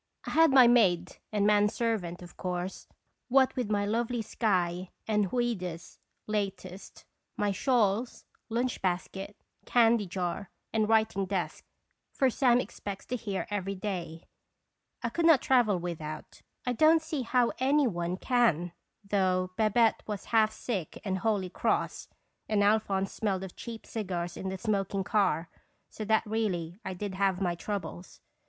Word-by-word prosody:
I - - -4
had 325 +1 +6
my 265 -2 +8
maid 190 -8 +3
and 205 -1 +1
man 210 0 +4
servant, 200 -7 -2
of 175 - -12
course. 180 0 -4 0.4
What 265 +1 +4
with 245 -5 -2
my 205 -1 +1
lovely 230 +2 -1
Skye, 185 -5 0 0.2
and 210 -4 +1
"Ouida's" 185 -9 -3 0.3
latest, 195 -3 -4 0.3
my 205 -1 +1
shawls, 230 +1 +1 0.2
lunch 240 +2 -1
basket, 195 +2 -3 0.3
candy 230 -3 +4
jar, 180 +2 -3 0.2
and 215 -1 +1
writing 220 -4 +2
desk 180 -5 -3 0.5
(for 265 -2 +2
Sam 245 -1 +4
expects 200 -5 -6
to 250 - -3
hear 205 -5 -3
every 195 -1 -2
day), 175 -5 -5 0.8
I 235 - 0
could 335 +7 +1
not 320 -5 +7
travel 240 -8 +3
without; 160 -3 -6 0.2
I 250 - 0
don't 315 +5 +5
see 315 -3 -3
how 245 0 +2
any 280 +3 +3
one 175 -4 -2
can, 190 - +2 0.4
though 185 -2 +1
Babette 220 +2 +3
was 210 -2 -4
half 220 -1 +5
sick 215 -6 -4
and 190 -1 -1
wholly 200 -4 0
cross, - - -1 0.4
and 210 -2 +3
Alphonse 200 -2 +2
smelled 195 -3 -1
of 190 - -8
cheap 230 -2 -8
cigars 180 -5 -4
in 190 - -4
the 190 - -4
smoking 195 -1 -1
car; 190 -6 +1 0.4
so 215 - -6
that 220 +1 +2
really 195 -5 -2
I 185 - -4
did 200 +1 -4
have 190 -1 +1
my 180 -3 0
troubles. 185 -1 -6
205 Hz, 150 wpm, -29 LUFS, 185-230 Hz, 0.8 s, my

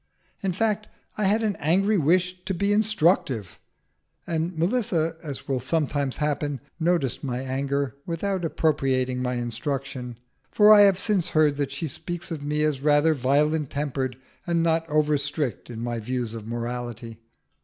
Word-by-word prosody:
In 195 - 0
fact, 215 +2 0 0.3
I 210 - 0
had 215 +4 +3
an 210 -2 0
angry 190 +7 +2
wish 180 +4 +1
to 190 - -2
be 200 +3 +1
instructive, 170 - +1 0.7
and 165 +1 -2
Melissa, 170 -4 +1
as 145 -4 -6
will 135 -2 0
sometimes 140 0 -1
happen, 145 -2 -1 0.2
noticed 165 -7 0
my 125 -3 -2
anger 135 0 -2
without 185 +2 -2
appropriating 135 -6 0
my 125 0 -1
instruction, 125 +1 -4 0.3
for 210 0 +7
I 210 - +8
have 195 -2 +6
since 195 -4 +1
heard 150 -2 +3
that 140 -2 -1
she 140 +4 -3
speaks 175 +4 -5
of 160 -3 -4
me 150 +1 -1
as 150 -3 0
rather 150 +2 +4
violent 145 +2 +1
tempered, 135 -3 -2 0.3
and 170 -1 +1
not 165 0 +1
over 150 -1 +2
strict 140 -3 -2
in 115 -2 -6
my 120 -1 -2
views 120 0 -3
of 110 -2 -7
morality. 120 -1 -5
150 Hz, 155 wpm, -25 LUFS, 130-175 Hz, 0.7 s, I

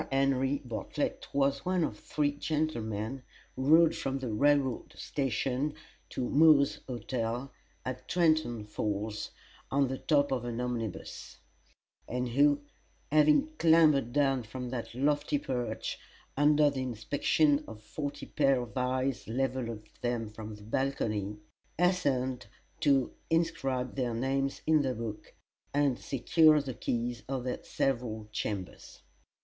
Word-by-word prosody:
Henry 135 0 +1
Bartlett 115 -3 -3
was 140 0 +1
one 180 -1 +1
of 105 -9 -3
three 145 -1 0
gentlemen 135 -6 -2 0.3
who 130 - -3
rode 160 +1 +6
from 135 0 -2
the 130 -4 -4
railroad 140 +1 +2
station 135 +2 -1 0.3
to 125 - -2
Moore's 150 -2 +5
Hotel, 120 +1 -3 0.3
at 130 0 -5
Trenton 155 -10 +2
Falls, 105 0 -3 0.4
on 140 -1 +2
the 130 - -3
top 145 -3 +2
of 130 -3 0
an 120 -1 -4
omnibus; 120 -5 -4 0.7
and 125 0 -2
who, 145 +3 +3 0.5
having 155 - +5
clambered 155 -7 +5
down 135 -1 +2
from 125 +2 -6
that 120 -2 -5
lofty 145 +2 +1
perch, 125 -5 -3 0.4
under 145 +1 +4
the 135 -2 -3
inspection 140 +5 +1
of 110 -1 -9
forty 145 +5 -5
pairs 135 -4 +2
of - - -18
eyes 130 0 -1
leveled 130 +1 -1
at 105 -2 -10
them 120 -3 -2
from 110 0 -8
the 105 - -14
balcony, 105 -4 -1 0.4
hastened 140 -8 +1 0.3
to 140 -4 +3 0.2
inscribe 135 -6 0
their 125 -4 -1
names 135 +3 -1
in 155 -1 +4
the 130 -2 -1
book, 110 -2 -6 0.4
and 140 -4 +2
secure 155 +3 +4
the 135 -3 -4
keys 120 +1 -2
of 135 -2 -2
their 125 0 -3
several 115 -5 -1
chambers. 100 -4 -5
130 Hz, 130 wpm, -30 LUFS, 120-145 Hz, 0.7 s, rode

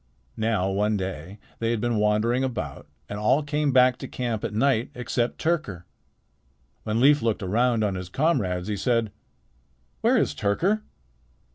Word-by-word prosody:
Now 110 -4 0
one 105 +2 +1
day 95 0 -5 0.2
they 115 - 0
had 115 -1 0
been 120 0 0
wandering 105 +4 +2
about 130 -3 -4 0.2
and 105 - -5
all 135 +8 +2
came 145 0 0
back 125 -1 +5
to - - -6
camp 120 -4 -3
at 115 - -2
night 115 +1 +1
except 120 0 -2
Tyrker. 155 - -1 1.0
When 110 +1 -1
Leif 145 +3 +5
looked 115 -2 -1
around 115 +4 +1
on 100 -2 0
his 90 -1 -6
comrades, 100 - 0
he 105 -1 -2
said: 115 -2 0 0.9
"Where - - +3
is - - +1
Tyrker?" 180 - 0
115 Hz, 155 wpm, -25 LUFS, 105-125 Hz, 1.0 s, back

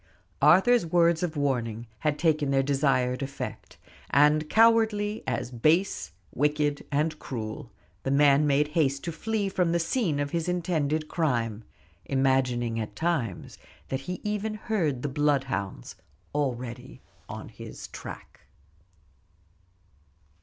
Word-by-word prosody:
Arthur's 190 - +6
words 170 0 +3
of 170 -3 -2
warning 120 -5 -1
had 150 +2 0
taken 155 -4 +1
their 135 0 +3
desired 135 -2 +1
effect; 135 0 -6 0.3
and 150 +2 +4
cowardly, 220 -2 +3
as 125 -1 -2
base, 155 - +1 0.2
wicked, 150 +1 0
and 155 +2 0
cruel, 110 -4 -6 0.3
the - - -3
man 140 +1 +4
made 145 +1 +2
haste 140 -4 +1
to 170 - -3
flee 210 +4 -2
from 180 -3 +1
the 170 - +2
scene 165 - 0
of 145 0 -2
his 170 0 -1
intended 160 -4 0
crime, 115 -10 -1 0.4
imagining 130 -4 +1
at 105 -1 -5
times 155 - -2 0.3
that 130 - -1
he 180 - -3
even 210 +1 -2
heard 175 - -1
the - - 0
bloodhounds 135 - -1 0.4
already 125 -5 -3 0.3
on - - -7
his - - -9
track. - - -10
145 Hz, 125 wpm, -27 LUFS, 130-170 Hz, 0.4 s, Arthur's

